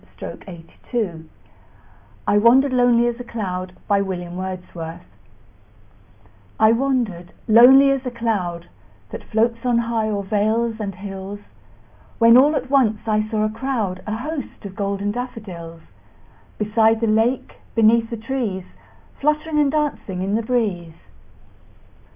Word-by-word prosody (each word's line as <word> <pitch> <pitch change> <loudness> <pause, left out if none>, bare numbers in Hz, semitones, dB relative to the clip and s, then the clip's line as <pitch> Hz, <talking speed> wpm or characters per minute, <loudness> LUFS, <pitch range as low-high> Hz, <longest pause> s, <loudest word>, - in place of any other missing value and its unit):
William - - -7
Wordsworth 170 0 -6 1.0
I 205 0 +4
Wandered 255 +5 +5
Lonely 245 -1 +4
As 240 0 -3
a - - -5
Cloud 185 -6 -5 2.9
I 220 0 +6
WANDERED 230 -9 -1 0.2
lonely 260 +5 +7
as 270 -1 -1
a 255 - -3
cloud 200 -8 -3 0.4
That - - -7
floats 230 +1 0
on 245 -2 +2
high 230 -2 0
o'er 200 -1 -2
vales 220 +3 0
and 200 -3 -4
hills, 195 +1 -7 0.8
When 230 0 +6
all 285 +5 +6
at 265 -2 -3
once 230 -7 +3
I 215 0 0
saw 215 -1 0
a - - 0
crowd, 220 -6 -3
A 215 - -2
host, 275 -3 -6
of 195 -1 -8
golden 200 0 -2
daffodils; 190 -9 -7 0.8
Beside 220 +1 +2
the 230 - 0
lake, 225 +4 0 0.2
beneath 225 0 +4
the 235 - -4
trees, 220 -5 -3 0.6
Fluttering 300 +1 0
and 285 -2 +3
dancing 285 -11 -2
in 195 +1 -2
the 225 - +1
breeze. 205 -9 -2
225 Hz, 125 wpm, -21 LUFS, 200-245 Hz, 2.9 s, lonely